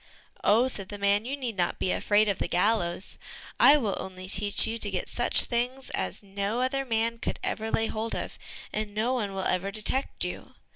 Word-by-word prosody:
"Oh," 230 +5 +4
said 195 -7 -1
the 205 - -6
man, 200 +2 +2
"you 275 +3 -3
need 245 -5 -4
not 175 -2 -1
be 185 - -1
afraid 210 +1 +2
of 200 - -1
the - - -1
gallows; 180 -1 0 0.4
I 290 - +8
will 215 -9 -1
only 185 -1 -7
teach 205 +1 +4
you 230 +1 -3
to 205 - 0
get 185 -2 -3
such 240 - +5
things 250 +2 -2
as - - -3
no 200 +3 -3
other 270 +1 0
man 230 -1 0
could - - -3
ever 220 0 -2
lay 225 - +1
hold 225 +1 -3
of, - - -6 0.3
and 210 -1 -4
no 230 +4 +1
one 205 -6 -2
will 190 - -3
ever 185 +2 0
detect 215 +6 0
you." - - -7
215 Hz, 205 wpm, -27 LUFS, 200-235 Hz, 0.4 s, I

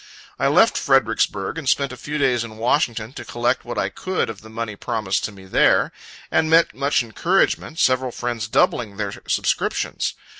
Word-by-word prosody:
I - - +2
left - - +4
Fredericksburg, 100 +11 +1
and 140 -5 -2
spent 140 -2 +1
a - - -7
few 145 +4 -5
days 125 -5 +2
in 110 -2 -9
Washington, 115 -1 0
to - - -7
collect 120 +2 -1
what 120 - -6
I - - 0
could 185 -10 -2
of 105 - -12
the 110 - -13
money 110 -1 -5
promised 105 -3 -2
to - - -5
me 95 -1 -14
there; 95 - +3 0.4
and 160 0 +2
met 165 +1 +4
much 140 -2 +1
encouragement, 160 - 0
several 130 -4 +2
friends 120 -2 -3
doubling 110 -2 +1
their 105 -2 -2 0.2
subscriptions. - - -1
120 Hz, 180 wpm, -22 LUFS, 110-140 Hz, 0.4 s, left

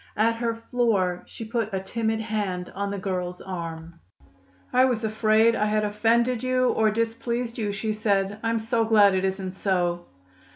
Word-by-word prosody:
At 230 +2 +2
her 230 -1 -1
floor, 225 -6 0
she 225 - -8
put 225 -1 -2
a - - 0
timid 220 +3 -2
hand 205 -5 -3
on 200 0 -3
the 200 - -3
girl's 180 -2 -3
arm. 170 -2 -7 0.7
"I 255 - +5
was 245 -4 +1
afraid 220 +1 +3
I 210 - +1
had 215 0 +1
offended 230 +3 +1
you 255 0 +2
or 220 -1 +3
displeased 230 +2 -2
you," 210 -2 -1
she 215 +2 -2
said. 205 -1 0
"I'm 230 0 0
so 225 +1 0
glad 210 -3 +5
it 190 0 0
isn't 190 -1 -2
so." 175 -2 -1
215 Hz, 170 wpm, -25 LUFS, 190-230 Hz, 0.7 s, I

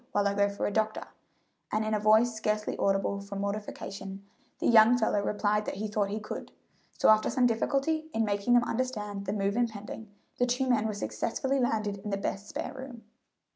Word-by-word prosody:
while 205 0 +2
I 200 - +1
go 200 0 +2
for 200 - -3
the - - 0
doctor;" 215 +1 -1 0.6
and 215 +1 0
in 215 - -1
a 215 - +2
voice 220 +3 +4
scarcely 215 -1 -1
audible 195 0 +1
from 200 0 -6
mortification 200 -1 -5 0.3
the - - -4
young 230 +1 +7
fellow 220 -3 +1
replied 210 +1 0
that - - -3
he 215 +3 -3
thought 205 -1 0
he 210 +2 -2
could; 215 - -7 0.5
so - - +4
after 215 0 +5
some 255 - +2
difficulty 275 +7 0
in 225 -3 +1
making 205 +3 +2
them 240 - +5
understand 210 -5 -3
the - - 0
move 200 -1 0
impending, 225 -2 -3 0.3
the 245 - +3
two 250 +2 0
men 230 -3 +2
were 215 - -3
successfully 265 +6 -1
landed 215 -5 0
in 210 - -6
the 200 - -1
best 195 0 -4
spare - - -4
room. 260 -3 -9
215 Hz, 200 wpm, -29 LUFS, 200-235 Hz, 0.6 s, young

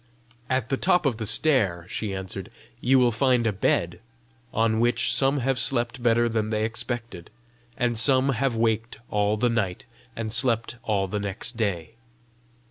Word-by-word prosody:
"At 130 -2 0
the 135 - 0
top 180 +1 +2
of 125 -5 +1
that 110 -2 -4
stair," 105 - +1
she 105 +2 -3
answered, 95 -1 -6 0.3
"you 130 +2 +3
will 125 -2 +4
find 125 +1 +2
a 110 - +1
bed 90 -2 0 0.5
on 110 0 +1
which 120 0 +1
some 135 0 +1
have 135 +1 0
slept 120 0 -1
better 120 0 +3
than 110 -2 -1
they 110 0 0
expected, 115 -5 -5 0.5
and 120 -1 0
some 130 +4 +3
have 135 -1 0
waked 115 0 0
all 105 +1 +1
the 120 - +2
night 105 -7 -2 0.3
and 110 -1 -4
slept 120 -1 +2
all 105 -4 0
the 105 +2 -3
next 100 +4 -2
day. 105 -1 -3
115 Hz, 165 wpm, -25 LUFS, 105-125 Hz, 0.5 s, will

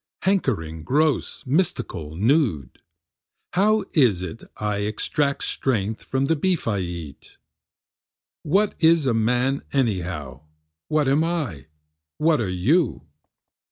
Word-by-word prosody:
hankering, 100 - 0
gross, 150 - 0
mystical, 130 - -1
nude; 110 - +1 0.7
How 210 +3 +3
is 115 - +3
it 90 +5 -7
I 105 -1 -1
extract 125 +7 -1
strength 110 -4 -1
from 135 +1 -1
the 165 - +2
beef 175 0 0
I 105 -3 +1
eat? 85 -5 -7 1.0
What 195 +7 +2
is 160 -2 +4
a 125 - +2
man 125 +5 +1
anyhow? 90 - -2 0.5
what 155 -2 +1
am 140 +4 +3
I? 145 - -3 0.5
what 155 -4 +3
are 105 - -1
you? 90 - +1
125 Hz, 115 wpm, -23 LUFS, -, 1.0 s, is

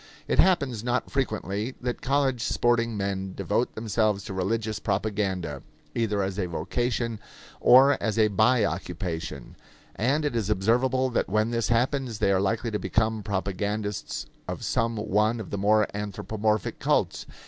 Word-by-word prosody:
It - - 0
happens 140 - +3
not 120 0 -1
frequently 110 -3 -2
that 125 -1 -3
college 135 -3 +1
sporting 115 -1 +1
men 95 -1 -3
devote 115 +4 -1
themselves 110 -2 0
to - - -6
religious 110 +3 -1
propaganda, 95 -7 -2 0.3
either 105 -4 0
as 95 +1 -3
a 90 - 0
vocation 115 +6 -2 0.4
or 135 +3 +6
as 110 -2 -1
a 110 -1 +5
by 110 +3 +3
occupation; 80 -5 -4 0.4
and 140 +8 +1
it 145 - -1
is 110 -3 -1
observable 125 +6 +2
that 120 - 0
when 110 +3 +1
this 115 -2 0
happens 125 0 0
they 100 - +2
are 95 -1 +3
likely 110 +3 0
to 105 - -1
become 110 0 0
propagandists 100 +1 -3 0.2
of - - -5
some 115 0 0
one 105 +2 +1
of 110 - -7
the 100 - -2
more 105 +1 +4
anthropomorphic 105 0 -2
cults. - - 0
110 Hz, 150 wpm, -26 LUFS, 100-120 Hz, 0.4 s, or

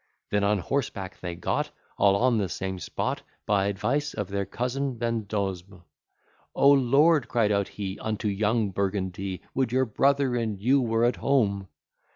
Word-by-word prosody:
Then 105 0 +2
on 105 +1 +3
horseback 95 -3 -3
they 90 -1 -5
got 85 - -1 0.3
All 100 -1 +4
on 120 +1 +3
the 95 -3 -1
same 95 +1 -4
spot, 80 - -3 0.2
By 100 -1 +2
advice 135 +9 -1
of 105 -4 -3
their 100 -1 -2
cousin 125 +4 -2
Vendosme, 100 -5 -3 0.7
O 140 - +6
Lord! 140 +2 +4
cried 110 -3 +1
out 100 -1 +1
he, 95 -2 -6
Unto 110 -1 -2
young 105 +1 +1
Burgundy, 95 -1 -2
Would 130 -3 0
your 130 +1 +2
brother 135 +2 +2
and 110 -4 -2
you 130 +6 +3
were 115 -1 +2
at 120 - +1
home! 100 -8 +1
105 Hz, 160 wpm, -26 LUFS, 100-125 Hz, 0.7 s, O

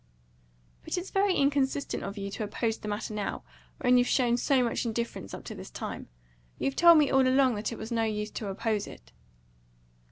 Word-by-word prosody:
"But - - -3
it's 360 +2 -5
very 390 -1 +2
inconsistent 280 0 0
of 200 +1 -6
you 200 0 -4
to 215 - -4
oppose 220 +2 -2
the 215 - -7
matter 210 +1 -3
now, 210 -1 -3 0.4
when 250 -1 +5
you've 245 - +2
shown 245 -2 +2
so 255 +1 +2
much 235 - -1
indifference 235 - -4
up - - -8
to - - -7
this - - -9
time. - - -6 0.5
You've 275 - -1
told 340 -1 +8
me, 295 -2 +3
all 265 -1 +4
along, 260 -1 +4
that 210 +2 -3
it 230 - -6
was 220 +2 -7
of 235 - 0
no 225 - +2
use 210 -1 -3
to 215 - -5
oppose 210 +1 -1
it." - - -13
235 Hz, 210 wpm, -29 LUFS, 215-270 Hz, 0.5 s, told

